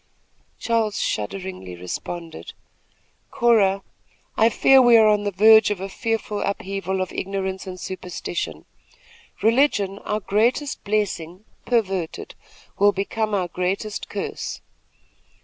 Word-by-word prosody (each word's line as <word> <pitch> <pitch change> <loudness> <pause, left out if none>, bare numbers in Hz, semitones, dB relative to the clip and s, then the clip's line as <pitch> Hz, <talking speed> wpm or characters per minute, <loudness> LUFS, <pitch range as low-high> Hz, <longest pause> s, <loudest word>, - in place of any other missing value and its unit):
Charles 225 -3 0
shudderingly 110 - -4
responded: 160 - -7 0.8
"Cora, 200 -5 +3 0.5
I 225 +1 +4
fear 265 +3 +5
we 240 -2 +7
are 220 -1 +6
on 210 -1 +2
the - - +1
verge 220 +3 +6
of 205 -3 -2
a 195 - -4
fearful 220 -1 -2
upheaval 195 -1 -2
of 185 - -3
ignorance 190 0 -3
and 185 -1 -7
superstition. 180 -1 -5 0.8
Religion, 215 -5 +2
our 210 - -2
greatest 235 +8 0
blessing, 200 -3 -2 0.2
perverted, 195 -8 -1 0.5
will 205 +1 +6
become 210 +2 -2
our 185 -3 0
greatest 185 +4 -3
curse. - - -5
200 Hz, 115 wpm, -23 LUFS, 185-220 Hz, 0.8 s, we